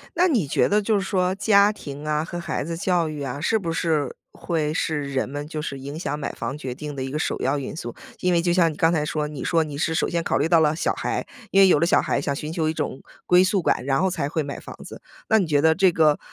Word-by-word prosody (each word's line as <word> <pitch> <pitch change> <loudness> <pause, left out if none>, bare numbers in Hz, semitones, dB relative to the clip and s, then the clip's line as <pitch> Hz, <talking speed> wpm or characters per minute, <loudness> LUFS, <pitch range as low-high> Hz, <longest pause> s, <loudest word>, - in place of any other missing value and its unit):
那 355 +1 +4
你 235 - +1
觉 - - +2
得， 210 +1 +2
就 215 +1 +1
是 - - -2
说 185 -1 0
家 200 0 +4
庭 145 -8 -8
啊， 150 0 +1
和 175 +2 -6
孩 170 -1 -3
子 165 +3 -4
教 175 -2 +1
育 150 -1 -6
啊， 135 0 -4
是 220 +8 +1
不 170 -5 -3
是 160 -5 0 0.2
会 155 -3 -2
是 145 -3 -2
人 130 -1 -1
们 145 +1 -5
就 155 -1 -5
是 140 -2 -5
影 140 +3 -7
响 150 - -3
买 140 - -3
房 125 +5 -4
决 130 -4 -5
定 150 +2 -7
的 135 - -3
一 135 - -4
个 150 - -2
首 - - -1
要 135 +3 0
因 135 - -6
素？ 120 -7 -6 0.2
因 180 0 +1
为 170 - +3
就 175 0 +1
像 170 -2 +3
你 - - -9
刚 165 0 +3
才 155 -3 0
说， 150 0 -2
你 150 -2 -7
说 165 -2 +2
你 150 -2 -7
是 160 +2 0
首 - - +1
先 170 -1 -1
考 - - 0
虑 145 - +1
到 165 -1 +5
了 155 -1 +3
小 170 - 0
孩， - - -3 0.3
因 195 - +5
为 195 - +8
有 175 - +4
了 170 - +3
小 170 - +4
孩， - - 0
想 140 0 -2
寻 150 +1 -5
求 160 -2 0
一 - - -1
种 150 -4 -4 0.2
归 180 +1 +5
宿 190 0 +1
感， 130 - 0
然 135 +2 +1
后 190 - +2
才 155 -6 -2
会 160 +1 -1
买 140 0 -6
房 - - -10
子。 - - -10 0.3
那 220 - +5
你 190 - +1
觉 145 -2 +2
得 160 0 +4
这 190 0 +4
个， 155 -3 +3
160 Hz, 310 characters per minute, -23 LUFS, 145-175 Hz, 0.3 s, 为